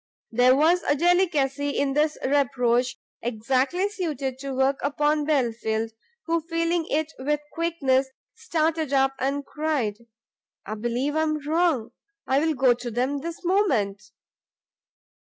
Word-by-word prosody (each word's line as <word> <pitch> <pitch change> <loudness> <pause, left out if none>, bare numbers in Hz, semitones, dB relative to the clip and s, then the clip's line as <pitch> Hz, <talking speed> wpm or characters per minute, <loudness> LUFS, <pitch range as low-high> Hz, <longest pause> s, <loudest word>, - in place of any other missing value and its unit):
There 250 +2 +5
was 330 +5 +4
a 290 - +1
delicacy 300 -5 +2
in 280 -1 +1
this 300 +2 +1
reproach 250 -3 +1 0.2
exactly 260 - 0
suited 295 - -3
to 275 0 -5
work 265 +1 +2
upon 295 +1 +1
Belfield, 225 -6 0 0.3
who 335 0 0
feeling 330 0 -1
it 315 +1 -1
with 295 +3 0
quickness, 275 -6 +1 0.2
started 320 - -1
up, 270 0 +3
and 280 +2 -1
cried, 250 -9 -2 0.6
"I 215 - -4
believe 240 +6 -2
I 315 - +2
am 305 -2 -1
wrong! 315 -8 +1 0.3
I 265 +1 +2
will 320 -1 +1
go 260 -2 +4
to 240 0 -6
them 255 +5 -1
this 335 +4 -7
moment!" 265 - +1
285 Hz, 135 wpm, -25 LUFS, 255-320 Hz, 0.6 s, There